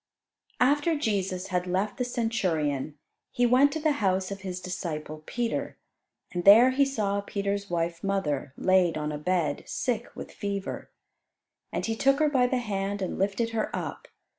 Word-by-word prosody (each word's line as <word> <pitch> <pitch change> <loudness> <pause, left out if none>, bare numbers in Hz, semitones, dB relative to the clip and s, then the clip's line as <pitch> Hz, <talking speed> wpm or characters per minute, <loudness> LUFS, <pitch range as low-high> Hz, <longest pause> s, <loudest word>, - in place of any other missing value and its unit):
After 290 +5 +3
Jesus 195 -7 -1
had 180 -1 -1
left 190 +3 -1
the 250 - 0
Centurion 165 - -1 0.3
He 245 - +1
went 255 +4 +5
to 315 - -2
the 310 0 +2
house 190 -1 +1
of 195 0 -6
his 185 -2 -4
disciple 155 -4 -5
Peter, 240 -1 -2 0.5
and 175 -2 -3
there 225 +7 +8
He 280 +2 +3
saw 205 -7 -1
Peter's 200 0 -3
wife's 170 -1 -2
mother, 155 -9 -1
laid 185 -3 +3
on 150 0 -2
a 150 - -4
bed, 160 -3 0
sick 240 -2 -2
with - - -8
fever. 200 -1 -4 0.8
And - - -2
He 225 - -1
took 275 +3 +3
her 305 0 +3
by 255 -3 +3
the 255 - 0
hand 200 -3 -2
and 185 - -4
lifted 200 +4 0
her 225 -1 -1
up. - - -5
200 Hz, 165 wpm, -27 LUFS, 180-240 Hz, 0.8 s, there